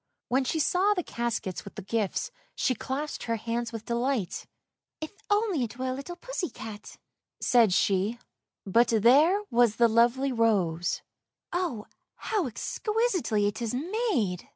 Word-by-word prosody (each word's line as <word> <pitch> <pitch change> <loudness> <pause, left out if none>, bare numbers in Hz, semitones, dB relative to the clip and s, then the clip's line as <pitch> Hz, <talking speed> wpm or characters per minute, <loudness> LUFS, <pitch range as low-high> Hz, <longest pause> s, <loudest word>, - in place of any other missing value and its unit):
When 260 +2 +2
she 320 - -1
saw 375 +7 +3
the 360 - -1
caskets 225 - -3
with 200 - -11
the - - -7
gifts 220 - -1 0.2
she 260 - +1
clapped 275 +5 -4
her 230 - 0
hands 230 +1 -3
with 225 -1 -7
delight! 235 -4 -1 0.3
" - - -64
If 315 - -6 0.2
only 410 - +2
it 235 +1 -5
were 260 0 -2
a - - -1
little 280 +7 -6
pussy 420 -3 -4
cat! 215 -1 -9 0.2
" - - -63
said 235 -5 +4
she 195 +4 +2 0.2
— - - -63
but 230 +5 +4
there 275 - +5
was 235 -2 +4
the 235 0 +5
lovely 240 +4 +3
rose. 190 -8 +1 0.5
"Oh, 335 - -2 0.3
how 415 -8 -1
exquisitely 365 - 0
it 205 +3 -2
is 235 0 -2
made!" 290 - -1
240 Hz, 160 wpm, -28 LUFS, 220-320 Hz, 0.5 s, there